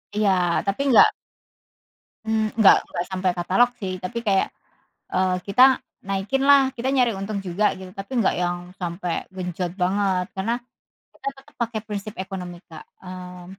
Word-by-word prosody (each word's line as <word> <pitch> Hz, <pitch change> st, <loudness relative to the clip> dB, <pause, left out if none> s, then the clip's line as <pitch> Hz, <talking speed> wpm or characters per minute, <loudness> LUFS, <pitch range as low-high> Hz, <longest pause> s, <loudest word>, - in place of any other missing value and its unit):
Iya, 210 Hz, -1 st, +3 dB, 0.4 s
tapi 200 Hz, +7 st, -1 dB
enggak 255 Hz, -, +8 dB, 1.2 s
mmm, 220 Hz, 0 st, 0 dB
enggak 215 Hz, -, +8 dB
enggak 175 Hz, -, -3 dB
sampai 185 Hz, -1 st, +1 dB
katalog 190 Hz, +8 st, +3 dB
sih, 190 Hz, -5 st, -4 dB
tapi 235 Hz, +6 st, -3 dB
kayak, 195 Hz, -2 st, +3 dB, 0.7 s
eee, 185 Hz, 0 st, +2 dB
kita 210 Hz, +6 st, +5 dB, 0.4 s
naikin 195 Hz, +7 st, -1 dB
lah, 275 Hz, -2 st, +6 dB
kita 245 Hz, +3 st, -1 dB
nyari 250 Hz, -3 st, +3 dB
untung 200 Hz, +1 st, -3 dB
juga 190 Hz, +3 st, 0 dB
gitu 185 Hz, -1 st, -10 dB
tapi 195 Hz, +4 st, -8 dB
enggak 195 Hz, -, +2 dB
yang 175 Hz, 0 st, 0 dB, 0.2 s
sampai 175 Hz, 0 st, -3 dB
genjot 180 Hz, -1 st, -3 dB
banget, 185 Hz, 0 st, +1 dB
karena 195 Hz, +5 st, -1 dB, 0.6 s
kita -, -, -5 dB
tetap 270 Hz, -, -18 dB
pakai 230 Hz, -1 st, -2 dB
prinsip 210 Hz, 0 st, -5 dB
ekonomi 185 Hz, -2 st, -6 dB
Kak. 160 Hz, -3 st, -11 dB, 0.2 s
Mmm, 180 Hz, -1 st, -9 dB
195 Hz, 150 wpm, -23 LUFS, 180-220 Hz, 1.2 s, enggak